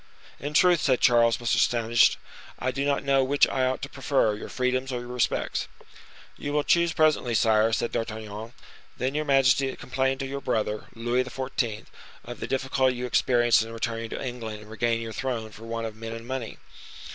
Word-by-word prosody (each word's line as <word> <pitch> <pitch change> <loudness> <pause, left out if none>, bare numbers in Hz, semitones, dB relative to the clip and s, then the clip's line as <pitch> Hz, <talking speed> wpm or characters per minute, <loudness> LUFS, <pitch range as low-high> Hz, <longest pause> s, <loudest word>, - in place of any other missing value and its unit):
"In 145 +2 -5
truth!" 175 0 +5
said 130 -3 +2
Charles, 115 -2 +4
much 120 -1 0
astonished, 120 -1 +3 0.4
"I 130 - -1
do 140 +1 -2
not 140 -1 0
know 135 -1 +3
which 140 +2 +3
I 130 -1 0
ought 130 - -2
to - - -2
prefer, 135 -5 +1
your 105 - -7
freedoms 130 +1 -1
or 125 -1 -3
your 120 - -9
respects." 125 -1 -1 0.7
"You 145 - -4
will 150 0 +2
choose 170 +2 +3
presently, 155 -7 +2
sire," 110 0 +3
said 115 +1 -1
D'Artagnan. 110 0 -5 0.4
"Then 130 +2 -1
your 155 +1 -1
majesty 135 -1 +3
complained 130 +1 -1
to - - -2
your 140 +1 -5
brother, 110 -4 -1
Louis 120 +2 0
XIV., 125 -4 -3 0.4
of 120 +1 -8
the - - -4
difficulty 130 -1 +1
you 125 +1 -4
experienced 120 -1 +3
in 115 +1 -5
returning 115 0 -3
to - - -5
England 110 -4 -6
and 105 +1 -13
regaining 115 +1 0
your 115 -1 -6
throne 115 -3 -3
for 110 +2 -12
want 115 0 -3
of 110 -1 -6
men 115 0 -7
and 115 0 -8
money." 130 -3 -5
125 Hz, 190 wpm, -26 LUFS, 115-135 Hz, 0.7 s, truth